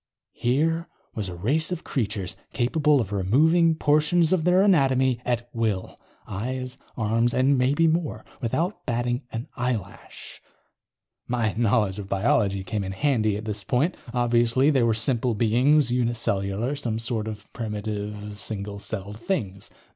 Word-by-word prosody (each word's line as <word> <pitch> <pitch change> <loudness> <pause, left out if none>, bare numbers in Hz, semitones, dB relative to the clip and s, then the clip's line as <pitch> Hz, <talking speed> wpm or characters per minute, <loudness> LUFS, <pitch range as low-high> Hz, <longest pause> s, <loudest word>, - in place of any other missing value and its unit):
Here 160 +7 0 0.3
was 105 -4 -4
a 90 - -6
race 140 - +1
of 180 - -3
creatures 100 -7 -2 0.2
capable 145 +5 +2
of 105 -5 -2
removing 160 - +3
portions 155 +3 +3
of 170 -4 +1
their 180 +2 +5
anatomy 130 - +3
at 120 -1 -1
will. 110 -5 -1 0.3
Eyes, 125 +5 -4 0.2
arms 115 +1 +1
and 130 +2 +4
maybe 135 +5 +2
more. 160 -1 -1 0.2
Without 165 - -1
batting 120 +1 0
an 115 +2 -5
eyelash. 120 -6 -5 0.9
My 115 -3 0
knowledge 105 -3 +1
of 100 -1 -7
biology 100 -1 +1
came 105 0 -3
in 95 0 -4
handy, 110 -3 +1
at 110 - -7
this 105 -2 -4
point. 135 - +1 0.2
Obviously 120 +3 +3
they 135 -3 +3
were 115 -2 +3
simple 120 0 0
beings, 120 +5 +3
uni 120 -1 +1
cellular, 100 +4 -1
some 120 -6 -3
sort 115 -1 -2
of 105 -1 -7
primitive 105 -1 -4
single 100 0 -5
celled 100 0 -6
things. 105 - -3
120 Hz, 145 wpm, -25 LUFS, 105-140 Hz, 0.9 s, their